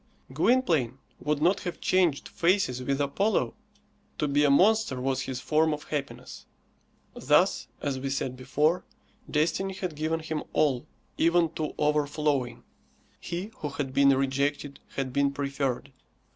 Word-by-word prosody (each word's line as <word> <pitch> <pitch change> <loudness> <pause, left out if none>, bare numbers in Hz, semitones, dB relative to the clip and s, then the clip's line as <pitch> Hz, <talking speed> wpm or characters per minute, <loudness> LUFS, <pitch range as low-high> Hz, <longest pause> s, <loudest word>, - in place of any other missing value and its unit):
Gwynplaine 160 - +2 0.2
would 150 0 -1
not 185 +4 +3
have 175 - -5
changed 175 -6 +2
faces 170 -8 +1
with 135 +2 -1
Apollo. 145 - +1 0.6
To 150 - 0
be 145 +1 +2
a 145 - +4
monster 195 -1 +4
was 135 +1 -1
his 130 -2 -4
form 155 +3 +2
of 150 - -11
happiness. 145 -2 -5 0.7
Thus, - - +2 0.2
as 135 -2 -1
we 135 +1 -3
said 135 -1 -2
before, 150 +7 +1 0.5
destiny 180 +5 0
had 180 -5 -4
given 160 +2 -1
him 160 -1 -3
all, 135 -5 +1 0.3
even 170 0 +4
to 155 -1 -4
overflowing. 145 -5 0 0.6
He 180 +5 -5
who 150 - -4
had 140 -2 -4
been 140 0 +5
rejected 140 +1 -1 0.2
had 130 -2 -2
been 140 0 +2
preferred. 140 -1 -2
145 Hz, 140 wpm, -27 LUFS, 135-165 Hz, 0.7 s, been